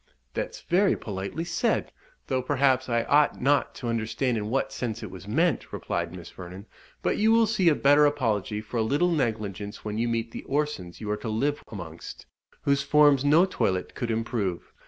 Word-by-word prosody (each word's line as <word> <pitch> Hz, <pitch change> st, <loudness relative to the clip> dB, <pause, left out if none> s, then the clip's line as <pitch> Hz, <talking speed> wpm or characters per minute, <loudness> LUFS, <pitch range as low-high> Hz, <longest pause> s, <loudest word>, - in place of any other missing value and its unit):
"That's -, -, -4 dB
very 190 Hz, +3 st, +3 dB
politely 100 Hz, +10 st, -4 dB
said 170 Hz, -, 0 dB, 0.3 s
though, 130 Hz, -, 0 dB
perhaps, 130 Hz, -1 st, +2 dB
I 120 Hz, -1 st, +2 dB
ought 145 Hz, +3 st, +3 dB
not 140 Hz, +3 st, +2 dB
to 120 Hz, -, -6 dB
understand 115 Hz, +2 st, -1 dB
in 105 Hz, -1 st, -3 dB
what 135 Hz, +2 st, -1 dB
sense 115 Hz, -4 st, -4 dB
it 105 Hz, -, -7 dB
was 95 Hz, +1 st, -10 dB
meant," 160 Hz, +5 st, +1 dB
replied 85 Hz, -1 st, -3 dB
Miss 90 Hz, -1 st, -10 dB
Vernon; 90 Hz, +2 st, -9 dB, 0.4 s
"but -, -, +1 dB
you 220 Hz, +1 st, +4 dB
will 230 Hz, 0 st, +5 dB
see 195 Hz, -5 st, +3 dB
a 155 Hz, -, +3 dB
better 145 Hz, +2 st, +5 dB
apology 110 Hz, -7 st, -1 dB
for 110 Hz, +3 st, -6 dB
a -, -, +2 dB
little 145 Hz, +10 st, +2 dB
negligence 105 Hz, -, -2 dB
when 105 Hz, +1 st, -3 dB
you 120 Hz, -, +1 dB
meet 115 Hz, 0 st, -2 dB
the -, -, -6 dB
Orsons 140 Hz, -13 st, -2 dB
you 105 Hz, -1 st, -3 dB
are 105 Hz, -, 0 dB
to 110 Hz, +2 st, -5 dB
live 140 Hz, +7 st, -1 dB
amongst, 85 Hz, -6 st, -8 dB, 0.4 s
whose 140 Hz, 0 st, +2 dB
forms 145 Hz, -2 st, +5 dB
no 155 Hz, +5 st, +5 dB
toilette 95 Hz, -, -1 dB
could 120 Hz, -, -4 dB
improve. 110 Hz, -5 st, -2 dB
120 Hz, 190 wpm, -26 LUFS, 105-145 Hz, 0.4 s, will